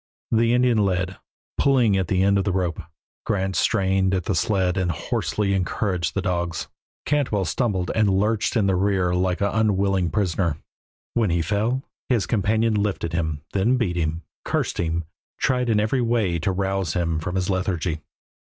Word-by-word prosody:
The 115 +1 +3
Indian 125 -2 +3
led, 95 -2 0 0.4
pulling 125 -7 +4
at 95 -2 0
the 95 +1 +2
end 100 0 +3
of 95 - -2
a - - +2
rope; 90 -2 -1 0.4
Grant 95 -1 -1
strained 95 +1 +2
at 90 - -1
the - - -1
sled 95 -1 +1
and 95 -2 0
hoarsely 100 +5 -1
encouraged 90 -2 -1
the 100 - -1
dogs; 85 -4 -2 0.4
Cantwell 125 -10 +1
stumbled 95 -3 -1
and 110 -2 +3
lurched 105 +5 +1
in 105 - +2
the 95 - +2
rear 95 -2 +1
like 90 +1 0
an 100 -1 +1
unwilling 100 -4 +2
prisoner. 90 -6 0 0.6
When 115 -4 +2
he 85 -1 +1
fell 110 +8 0 0.3
his 120 -6 +2
companion 110 +1 +1
lifted 100 -5 -1
him, 80 -3 -1
then 110 +6 +2
beat 100 -8 0
him, 80 -1 -2 0.2
cursed - - -1
him, 85 0 -1 0.3
tried 125 -2 +1
in 110 -2 +3
every 110 +5 +1
way 115 -8 +1
to 90 +5 0
rouse 95 -3 -1
him 85 -3 0
from 90 +3 -4
his 95 -1 0
lethargy. 90 -4 -1
95 Hz, 170 wpm, -23 LUFS, 90-105 Hz, 0.6 s, pulling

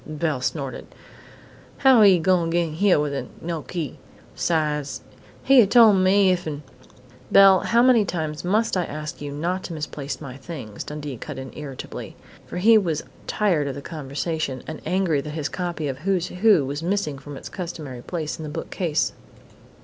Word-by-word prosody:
Belle 155 -3 -2
snorted. 135 0 -3 0.9
"How 265 -4 +6
he 195 -3 +7
gonna 175 0 +2
get 170 +1 +1
in 155 - -7
hyer 195 -3 +4
widout 140 -4 -2
no 165 -1 -4
key? 160 0 -5 0.4
'Sides, 150 -3 -1 0.4
he'd 270 -2 +7
a 210 - +4
tol' 225 0 +7
me 190 0 +4
if'n 155 -5 -3 0.3
" 125 0 -24
"Belle, 195 -1 +8
how 235 +1 +3
many 250 -4 +5
times 155 -5 -3
must 210 +5 +1
I 180 - +1
ask 150 0 -6
you 145 -1 -5
not 175 +6 -2
to 170 - -6
misplace 150 -2 -5
my 135 -3 -8
things?" 130 -8 -7
Dundee 150 -3 -6
cut 145 +4 -7
in 130 -1 -7
irritably, 140 -3 -8 0.3
for - - -6
he 220 +4 +6
was 165 -6 -2 0.2
tired 175 -9 +1
of 135 - -4
the 140 - -6 0.2
discussion, 140 -1 -3
and 155 - -7
angry 180 -6 +1
that 150 +1 -7
his 150 -1 -2
copy 175 -4 -3
of 135 -1 -4
"Who's 185 +1 0
Who" 185 -5 +4
was 140 +3 -4
missing 170 -6 -1
from 145 0 -9
its - - -9
customary 160 -9 -6
place 160 +1 -4
in - - -6
the 155 - -5
bookcase. 160 0 -2
160 Hz, 180 wpm, -23 LUFS, 145-185 Hz, 0.9 s, Belle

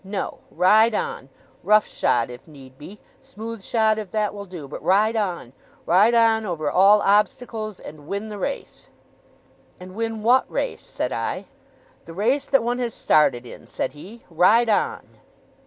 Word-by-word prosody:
No! 195 +1 -5
Ride 215 +5 +4
on! 470 0 -4 0.3
Rough 215 0 +4
shod 120 0 0
if 125 - -12
need 135 -4 -15
be, 165 +9 -12 0.2
smooth 225 0 -9
shod 220 +1 +1
if 210 -3 -7
that 210 +1 -1
will 200 -1 -8
do, 175 -6 -9
but 140 - -8
ride 215 +4 +2
on! 180 - -3 0.3
Ride 205 +7 +4
on 225 -1 +3
over 160 -7 -3
all 200 +4 +5
obstacles, 215 0 0
and 150 -1 -12
win 200 +4 -4
the 210 -1 -7
race!' 280 +8 -6 0.9
'And 185 0 -11
win 225 0 -4
what 250 +3 +3
race?' - - -3
said - - -4
I. - - -3 0.6
'The 165 - -11
race 255 +9 0
that 270 -4 +2
one 245 +1 -1
has 240 -2 -3
started 130 -5 +2
in,' - - -12
said - - -4
he. 200 +10 -13
'Ride 215 +8 +4
on! 210 - 0
210 Hz, 165 wpm, -22 LUFS, 180-225 Hz, 0.9 s, all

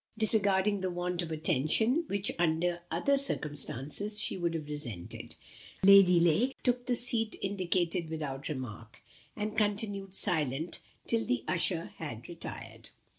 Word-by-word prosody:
Disregarding 205 -2 +2
the 185 - -1
want 175 0 -2
of 170 - -5
attention, 165 - +2
which, 200 0 +2
under 175 +1 +1
other 275 +12 +2
circumstances, 150 - -1
she - - +1
would 170 -2 -2
have 155 -2 -5
resented, 130 - -5 0.5
Lady 195 -2 +7
Lake 200 - +2
took 245 -1 +1
the 245 - +1
seat 230 -2 +2
indicated 180 -3 -1
without 145 -4 -5
remark, 115 -5 -7 0.3
and 210 0 -4
continued 205 -2 -1
silent 160 -4 +2 0.3
till 230 -1 0
the 120 -2 -1
usher 170 -1 +1
had 120 -8 -6
retired. 115 -9 -8
175 Hz, 130 wpm, -30 LUFS, 150-205 Hz, 0.5 s, Lady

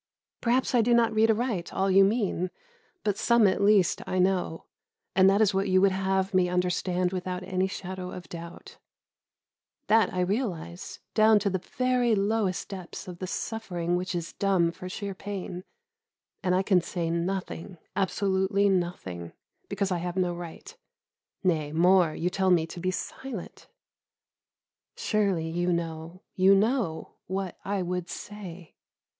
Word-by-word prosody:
Perhaps 250 +3 +1
I 245 - +5
do 235 +1 +3
not 235 -1 +3
read 220 +1 +4
aright 220 -5 0
all 195 0 +1
you 195 +1 +7
mean; 195 -3 +1 0.5
but 205 -1 0
some 235 -2 +4
at 190 0 +2
least 200 -2 +4
I 185 - -1
know, 185 -3 +1 0.5
and 190 0 +6
that 200 +2 +3
is 210 -2 +4
what 195 +1 0
you 185 0 +5
would 195 0 +4
have 190 0 0
me 185 -1 +3
understand 180 0 0
without 185 0 -3
any 185 0 0
shadow 185 -1 -6
of 180 -1 -8
doubt. 170 0 -10 1.1
That 220 -3 +4
I 180 - -1
realise, 180 -4 -3
down 220 0 +6
to 200 -1 0
the 190 - 0
very 250 0 +1
lowest 200 -2 0
depths 185 -2 -8
of 180 -1 -8
the 185 - -4
suffering 175 -5 -2
which 180 +1 -2
is 170 -1 -4
dumb 190 -4 +2
for 185 +1 -8
sheer 200 +1 -4
pain; 185 -2 -6 0.8
and 180 -2 +1
I 190 - +2
can 190 -2 +3
say 170 -1 -3
nothing, 180 +1 -3 0.2
absolutely 195 0 +1
nothing, 170 - -2 0.4
because 200 -1 -1
I 180 - 0
have 175 +1 -4
no 180 -2 +1
right; 175 - -9 0.7
nay, 155 -5 +1
more, 175 0 +4
you 180 +2 -1
tell 190 0 +1
me 170 -3 +4
to 170 +2 -9
be 185 +2 -1
silent. 220 +2 -6 1.3
Surely 200 -7 0
you 175 +2 0
know, 170 +1 -4
you 190 +1 +5
know, 205 -6 0
what 190 0 -4
I 195 -1 -1
would 180 0 -3
say? 185 -5 -8
185 Hz, 155 wpm, -27 LUFS, 175-200 Hz, 1.3 s, you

